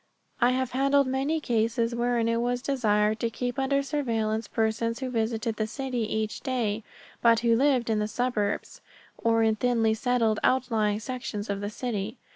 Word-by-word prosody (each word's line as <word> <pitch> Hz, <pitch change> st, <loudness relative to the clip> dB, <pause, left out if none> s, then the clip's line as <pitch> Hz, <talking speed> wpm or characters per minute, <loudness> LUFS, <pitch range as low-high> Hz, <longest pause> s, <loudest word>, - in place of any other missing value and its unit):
I 240 Hz, -, +5 dB
have 260 Hz, -1 st, -1 dB
handled 275 Hz, +2 st, +3 dB
many 270 Hz, +5 st, 0 dB
cases 230 Hz, -2 st, 0 dB
wherein 235 Hz, -1 st, +1 dB
it 230 Hz, 0 st, +1 dB
was 245 Hz, +1 st, -1 dB
desired 215 Hz, -5 st, +1 dB
to 230 Hz, -, 0 dB
keep 245 Hz, +3 st, -3 dB
under 275 Hz, +1 st, +1 dB
surveillance 225 Hz, -6 st, -1 dB
persons 225 Hz, +1 st, 0 dB
who 260 Hz, -1 st, -4 dB
visited 225 Hz, -1 st, -1 dB
the 215 Hz, -, -1 dB
city 245 Hz, -2 st, -3 dB
each 220 Hz, 0 st, -2 dB
day, 230 Hz, -5 st, -1 dB, 0.4 s
but 230 Hz, -1 st, +5 dB
who 235 Hz, -1 st, +3 dB
lived 260 Hz, -1 st, +2 dB
in 220 Hz, -2 st, +1 dB
the 210 Hz, -, 0 dB
suburbs, 245 Hz, -, -2 dB, 0.4 s
or 225 Hz, 0 st, +2 dB
in 220 Hz, -1 st, +2 dB
thinly 230 Hz, -2 st, +2 dB
settled 225 Hz, -2 st, +1 dB
outlying 225 Hz, -5 st, +2 dB
sections 220 Hz, -4 st, -4 dB
of 200 Hz, 0 st, -3 dB
the 205 Hz, -, -3 dB
city. 215 Hz, -2 st, -4 dB
230 Hz, 170 wpm, -27 LUFS, 220-255 Hz, 0.4 s, I